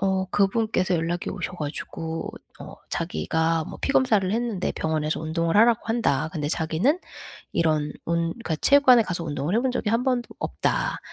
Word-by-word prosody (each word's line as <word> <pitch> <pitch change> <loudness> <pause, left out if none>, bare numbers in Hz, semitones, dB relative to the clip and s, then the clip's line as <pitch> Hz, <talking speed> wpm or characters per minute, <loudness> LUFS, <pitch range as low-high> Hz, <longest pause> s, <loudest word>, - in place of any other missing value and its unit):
어 190 -1 +1
그분께서 200 -2 +1
연락이 170 +1 -1
오셔 - - -5
가지고 160 +1 -4 0.3
어 - - -9 0.2
자기가 160 - 0
뭐 - - -9
피 - - 0
검사를 215 -9 +3
했는데 225 -4 -1
병원에서 155 -1 -1
운동을 165 +2 0
하라고 230 +1 +5
한다. 225 - +1
근데 150 -4 -2
자기는 165 - +1 0.5
이런 155 -2 +1
운 170 0 +1
그러니까 230 -9 -3
체육관에 260 - +6
가서 180 -4 -4
운동을 155 +4 -1
해 - - +3
본 260 0 0
적이 230 -4 -1
한번도 245 +1 +1
없다. - - -1
180 Hz, 360 characters per minute, -25 LUFS, 160-230 Hz, 0.5 s, 체육관에